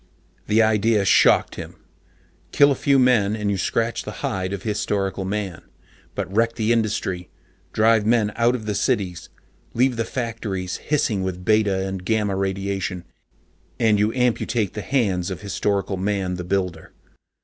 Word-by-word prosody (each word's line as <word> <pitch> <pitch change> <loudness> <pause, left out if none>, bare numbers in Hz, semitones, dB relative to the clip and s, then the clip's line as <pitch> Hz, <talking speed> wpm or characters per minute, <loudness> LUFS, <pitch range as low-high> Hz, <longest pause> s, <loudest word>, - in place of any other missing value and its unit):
The 110 +2 +4
idea 110 -1 +2
shocked - - +4
him. - - -8 0.8
Kill 140 0 +5
a - - +4
few 140 +1 +2
men, 120 -6 +3
and 105 -2 -1
you 100 - -1
scratch 115 +5 -1
the - - -6
hide 95 0 -2
of 100 -2 -5
Historical 100 -3 -2
Man. 95 -3 -3 0.5
But 95 - -4
wreck 115 +1 +2
the 110 0 +1
industry, 105 -5 -1 0.4
drive 110 0 +3
men 110 -1 +2
out 120 +1 +2
of 110 -4 -6
the 105 - -1
cities, 100 - -1 0.5
leave 125 +1 +2
the 115 - +1
factories 110 -7 -4
hissing 130 -9 0
with 90 -1 -4
beta 105 -3 +2
and 95 -1 -5
gamma 105 -1 0
radiation, 95 -1 -2 0.8
and 110 -3 +3
you 105 +1 +2
amputate 120 -4 0
the 105 - -4
hands 100 -9 0
of 95 - -6
Historical 100 0 -1
Man 95 -1 -1
the 90 0 -4
Builder. 90 -3 -3
105 Hz, 155 wpm, -22 LUFS, 95-115 Hz, 0.8 s, Kill